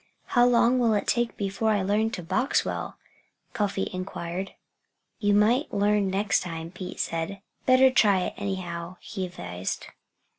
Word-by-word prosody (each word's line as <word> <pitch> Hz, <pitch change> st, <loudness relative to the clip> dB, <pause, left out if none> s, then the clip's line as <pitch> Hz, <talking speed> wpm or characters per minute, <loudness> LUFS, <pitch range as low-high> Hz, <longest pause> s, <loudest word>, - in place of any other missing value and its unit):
"How 245 Hz, 0 st, +6 dB
long 245 Hz, +1 st, +4 dB
will 230 Hz, -3 st, +3 dB
it 200 Hz, -, +1 dB
be 240 Hz, -1 st, +1 dB
before 200 Hz, +2 st, -1 dB
I 205 Hz, -3 st, +2 dB
learn 210 Hz, +3 st, +1 dB
to 205 Hz, -6 st, -6 dB
box 195 Hz, -, +1 dB
well?" -, -, -4 dB, 0.6 s
Cuffy 200 Hz, -2 st, -1 dB
inquired. 185 Hz, 0 st, -5 dB, 0.6 s
"You 205 Hz, -2 st, +3 dB
might 235 Hz, +8 st, +3 dB
learn 205 Hz, 0 st, +2 dB
next 200 Hz, +2 st, +1 dB
time," 165 Hz, -2 st, -6 dB
Pete 185 Hz, 0 st, -8 dB
said, 165 Hz, +4 st, -2 dB, 0.3 s
"Better 260 Hz, 0 st, +6 dB
try 205 Hz, -7 st, +4 dB
it, -, -, -2 dB
anyhow," 180 Hz, -3 st, -4 dB
he 190 Hz, -4 st, -5 dB
advised. 90 Hz, -, -5 dB
200 Hz, 150 wpm, -26 LUFS, 185-220 Hz, 0.6 s, How